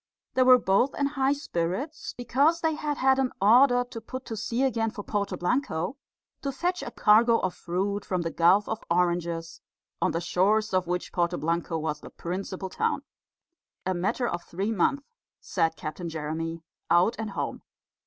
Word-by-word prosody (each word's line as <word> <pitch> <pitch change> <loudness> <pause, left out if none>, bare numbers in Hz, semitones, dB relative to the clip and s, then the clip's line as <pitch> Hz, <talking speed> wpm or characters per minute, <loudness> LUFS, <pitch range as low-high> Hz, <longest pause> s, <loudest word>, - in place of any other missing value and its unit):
They 260 - +2
were 255 0 +8
both 230 +4 +2
in 285 - 0
high 275 -1 +1
spirits, 265 - -3
because 275 +7 +2
they 320 -1 +2
had 300 -1 -2
had 265 0 +3
an 260 -2 +1
order 245 +5 +6
to 230 - -6
put 255 +4 -7
to 225 - -5
sea 230 +4 -1
again 230 -4 +1
for 210 -1 -7
Porto 200 -3 -2
Blanco, 180 - -1 0.5
to 275 - -2
fetch 350 +6 -1
a - - -5
cargo 230 +1 +5
of 185 -4 -1
fruit 195 +4 -2
from 180 -2 -2
the 165 - -2
Gulf 185 +5 +4
of 220 0 -4
Oranges, 170 -1 0 0.4
on - - +3
the 165 - -1
shores 195 +5 +1
of 185 -2 +1
which 180 0 -3
Porto 175 0 +1
Blanco 165 +1 -1
was 155 -1 -3
the - - -10
principal 190 +2 -5
town. 455 - -1 0.8
"A 185 - +1
matter 195 +7 0
of 175 -4 -3
three 195 +5 -3
months," 250 +8 +1 0.4
said 165 -3 0
Captain 165 +3 -5
Jeremy, 165 +1 -4 0.3
"out 175 +7 +4
and 220 -1 -3
home." 195 - -4
200 Hz, 175 wpm, -27 LUFS, 175-255 Hz, 0.8 s, were